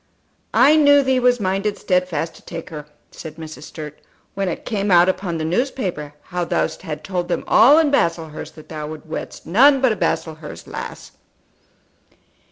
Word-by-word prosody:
"I 290 +4 +6
knew 285 -2 +6
thee 265 -1 +2
was 245 0 +3
minded 195 +1 -1
stedfast 180 -4 -1
to - - -16
take 170 +1 -8
her," 150 -2 -8 0.2
said 155 -2 -9
Mrs. 155 -2 -9
Sturt, 150 -2 -9 0.3
"when 195 -1 -2
it 170 - -6
came 205 -3 -2
out 175 -1 +6
upon 185 -2 -1
the 160 - -3
newspaper 175 - -2
how 180 0 -3
thou 170 - 0
hadst 150 -2 -8
told 180 -2 -3
them 175 - -2
all 270 +7 +6
in 315 -3 +3
Baslehurst 165 - -1
that 155 - -14
thou 150 -2 -5
wouldst 155 0 -9
wed 155 - -6
none 270 - +5
but 260 -2 +3
a - - 0
Baslehurst 160 -5 -3
lass." - - -8
180 Hz, 175 wpm, -20 LUFS, 160-235 Hz, 0.3 s, I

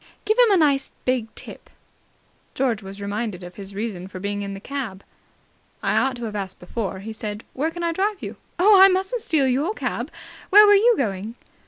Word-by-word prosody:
"Give 430 +1 +2
him 485 -2 +7
a 395 - +5
nice 280 -4 +2 0.2
big 250 -3 +1
tip." - - -9 0.9
George 245 -5 0
was 195 0 -9
reminded 205 -2 -3
of 180 0 -9
his 195 0 -9
reason 200 -4 -4
for 185 -1 -8
being 205 +1 -3
in 200 0 -5
the - - -7
cab. 225 -5 -5 0.8
"I - - +1
ought 265 -1 +2
to 240 - -8
have 215 -2 -4
asked 195 -2 -4
before," 190 0 -4
he 220 +2 -6
said. 210 -1 -6
"Where 300 +5 -1
can 345 +1 -6
I 335 - +1
drive 390 +4 -1
you?" - - -6 0.2
"Oh, 385 +2 +7
I 385 - +11
mustn't 385 +5 0
steal 315 -9 +1
your 285 - 0
cab. - - -3 0.4
Where 420 +2 +9
were 410 - +7
you 455 +4 +5
going?" 210 -2 -2
240 Hz, 205 wpm, -23 LUFS, -, 0.9 s, I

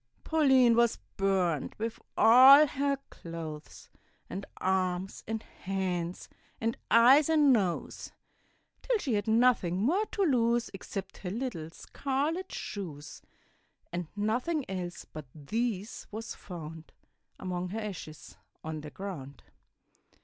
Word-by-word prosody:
Pauline 265 -7 +4
was 235 -1 +3 0.2
burnt 185 -6 0
with 225 +1 -4 0.2
all 265 +6 +9
her 280 -1 -1
clothes, 160 -3 -8 0.4
And 195 - -5
arms 185 0 -1
and 225 0 -3
hands, 180 -2 -4 0.3
and 230 0 -1
eyes 260 +7 +6
and 300 -4 +5
nose; 190 -7 -1 0.7
Till - - +1
she 280 - -2
had 205 0 0
nothing 220 -6 +3
more 340 - +1
to 400 - -1
lose 240 -6 +2
Except 195 0 -7
her 180 - -6
little 210 -7 -4
scarlet 285 - -3
shoes; 155 -8 -7 0.7
And 175 -1 -3
nothing 245 +9 -1
else 180 -2 -5
but 155 -3 -10
these 210 +6 -3
was 220 +2 -6
found 165 -3 -9 0.4
Among 180 -1 -4
her 215 +4 -4
ashes 185 -8 -8 0.3
on 155 -1 -5
the 150 - -8
ground. 150 -6 -8
205 Hz, 120 wpm, -30 LUFS, 175-250 Hz, 0.7 s, all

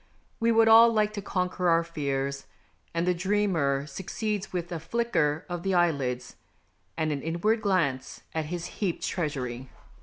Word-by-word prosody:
We 230 0 +3
would 225 0 +5
all 230 +1 +8
like 215 -1 +1
to 205 - -4
conquer 180 -2 -1
our 165 0 +4
fears, 140 -4 -3 0.4
and 170 +1 -1
the 180 - +3
dreamer 175 -7 +1
succeeds 195 +6 -4
with 175 -1 -4
a 170 - -3
flicker 160 -6 0
of 175 -1 -4
the 190 +1 0
eyelids 140 -8 0 0.6
and 155 -1 0
an 140 -2 -2
inward 175 +9 0
glance 170 -11 0
at 160 -1 -1
his 175 +2 -4
heaped 190 -5 -3
treasury. 130 -7 -3
175 Hz, 155 wpm, -27 LUFS, 150-200 Hz, 0.6 s, all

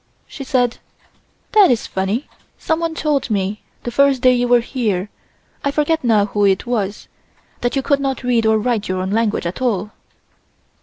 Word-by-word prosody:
She 275 - -9
said: 255 -3 +1 0.7
"That 420 -3 +6
is 240 -3 +1
funny, 195 +8 -2 0.3
someone 325 0 -1
told 300 -5 0
me 200 0 -1 0.2
the 240 - -4
first 275 -1 +3
day 255 0 +6
you 245 0 +1
were 245 0 +5
here, 215 -6 -2 0.5
I 280 - +1
forget 300 +2 0
now 220 -4 +3
who 205 0 -1
it 195 +1 +2
was, 210 -4 -2 0.5
that 245 +2 -1
you 270 - 0
could 280 0 +2
not 270 -2 -2
read 235 -3 +2
or 220 0 +4
write 225 -1 -1
your 185 0 -2
own 190 +1 -3
language 220 -2 0
at 170 +8 -4
all." 210 -5 -1
240 Hz, 175 wpm, -19 LUFS, 210-270 Hz, 0.7 s, That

